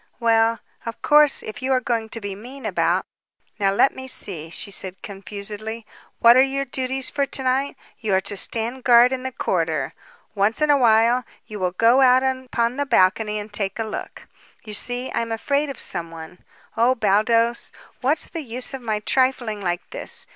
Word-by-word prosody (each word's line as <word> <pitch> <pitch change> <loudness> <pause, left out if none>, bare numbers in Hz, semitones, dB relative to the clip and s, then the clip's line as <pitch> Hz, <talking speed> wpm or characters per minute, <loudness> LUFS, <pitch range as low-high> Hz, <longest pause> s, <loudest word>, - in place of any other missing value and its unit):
"Well, 225 -1 +2 0.2
of 230 - -6
course, 295 -1 +4
if 215 +6 -7
you 260 +1 -1
are 255 - +3
going 230 -3 -2
to 230 - -5
be 200 -2 -5
mean 250 +7 -10
about 175 -2 +1 0.5
Now, 195 -1 +2
let 200 +7 +3
me 260 0 -8
see," 165 -10 -4
she 185 +4 -4
said 190 -1 0
confusedly; 210 +2 -5 0.3
"what 235 0 +7
are 260 - +7
your 275 +1 0
duties 260 +1 -1
for 280 -1 0
to 265 - -2
night? 265 +2 0 0.2
You 210 -4 0
are 190 - +2
to 200 - -3
stand 235 +5 -1
guard 245 +1 +6
in 260 - -3
the 260 0 -4
corridor. - - -1 0.4
Once 205 +2 +1
in 300 -1 +3
awhile 240 -2 +4 0.2
you 215 -2 -8
will 180 -1 -1
go 230 +7 +4
out 255 0 +5
upon 260 -2 -1
the 285 - 0
balcony 210 -1 +2
and 210 0 -7
take 195 -1 -3
a 225 - -1
look. 215 -1 -7 0.4
You 215 - -7
see, 245 +4 -1
I - - -1
am 230 0 -4
afraid 280 +6 0
of 275 - -6
someone. 165 -1 -4 0.4
Oh, 240 +3 +3
Baldos, 230 +2 +1 0.3
what's 285 +5 0
the 330 - -6
use 250 0 -5
of 265 - -6
my 215 -3 -2
trifling 245 -4 0
like 175 -1 -3
this? - - -3
230 Hz, 190 wpm, -22 LUFS, 205-260 Hz, 0.5 s, what